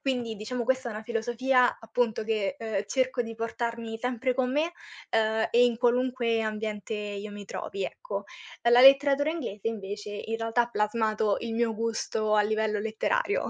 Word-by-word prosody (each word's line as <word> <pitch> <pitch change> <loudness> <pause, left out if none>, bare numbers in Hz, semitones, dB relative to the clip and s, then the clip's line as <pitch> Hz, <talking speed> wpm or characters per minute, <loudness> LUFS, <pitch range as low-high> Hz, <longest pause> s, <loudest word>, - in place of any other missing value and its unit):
Quindi, 245 -4 -2
diciamo 235 +3 -3
questa 260 0 0
è - - -5
una 215 +1 -6
filosofia, 240 +3 +2
appunto, 225 -1 -1
che, 215 +2 -1
ehm, 215 -3 -2
cerco 260 +2 0
di 225 -1 -3
portarmi 230 0 -4
sempre 250 +1 -1
con 250 0 0
me, 315 +4 +1 0.4
ehm, 220 0 +2
e 240 +1 +5
in 235 - 0
qualunque 245 -1 +1
ambiente 215 -1 -3
io 205 0 -5
mi 205 0 -8
trovi, 395 - -5
ecco. - - -5 0.4
La 235 - +3
la 240 +1 +7
letteratura 275 +2 +7
inglese 225 - -3
invece, 205 -1 -5
in 225 +2 -3
realtà 225 +1 +1
ha 240 - -6
plasmato 215 -1 +1
il 230 -1 -4
mio 230 -1 +1
gusto 220 -1 -1
a 210 - +5
livello 215 0 0
letterario. 225 - 0
225 Hz, 175 wpm, -28 LUFS, 215-250 Hz, 0.4 s, la